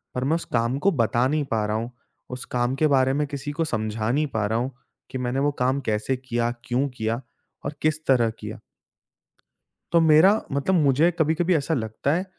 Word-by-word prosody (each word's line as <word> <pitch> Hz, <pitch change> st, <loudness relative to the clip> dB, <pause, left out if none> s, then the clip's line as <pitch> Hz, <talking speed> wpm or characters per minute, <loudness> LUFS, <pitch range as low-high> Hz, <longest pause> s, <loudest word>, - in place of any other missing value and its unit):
पर 125 Hz, -, -1 dB
मैं 155 Hz, +5 st, +2 dB
उस 170 Hz, -, -3 dB
काम 115 Hz, +3 st, +1 dB
को 200 Hz, -, +6 dB
बता 120 Hz, -2 st, +2 dB
नहीं 150 Hz, +1 st, 0 dB
पा 110 Hz, -2 st, +1 dB
रहा 105 Hz, +1 st, -1 dB
हूँ। 115 Hz, +2 st, -4 dB, 0.4 s
उस 125 Hz, -, -6 dB
काम 120 Hz, +2 st, +1 dB
के 155 Hz, +2 st, +2 dB
बारे 130 Hz, -2 st, +3 dB
में 150 Hz, +1 st, 0 dB
किसी 140 Hz, +1 st, -5 dB
को 165 Hz, -, +1 dB
समझा 110 Hz, -2 st, -2 dB
नहीं 150 Hz, +3 st, +1 dB
पा 110 Hz, -2 st, 0 dB
रहा 110 Hz, +1 st, 0 dB
हूँ 130 Hz, +2 st, -2 dB, 0.4 s
कि 130 Hz, -, -3 dB
मैंने 125 Hz, +1 st, -1 dB
वो 145 Hz, +1 st, +2 dB
काम 130 Hz, +2 st, +2 dB
कैसे 110 Hz, +4 st, -1 dB
किया, 120 Hz, -2 st, -1 dB
क्यों 130 Hz, +3 st, 0 dB
किया 115 Hz, 0 st, -3 dB, 0.4 s
और 145 Hz, -, -3 dB
किस 155 Hz, 0 st, 0 dB
तरह 120 Hz, -4 st, +4 dB
किया। 105 Hz, +2 st, -7 dB, 1.3 s
तो 170 Hz, -, +5 dB
मेरा 165 Hz, +7 st, +6 dB
मतलब 140 Hz, +7 st, +1 dB
मुझे 150 Hz, +1 st, +4 dB
कभी-कभी 165 Hz, +3 st, +2 dB
ऐसा 155 Hz, +3 st, 0 dB
लगता 110 Hz, +3 st, -1 dB
है 180 Hz, +3 st, -1 dB
130 Hz, 205 wpm, -24 LUFS, 115-150 Hz, 1.3 s, को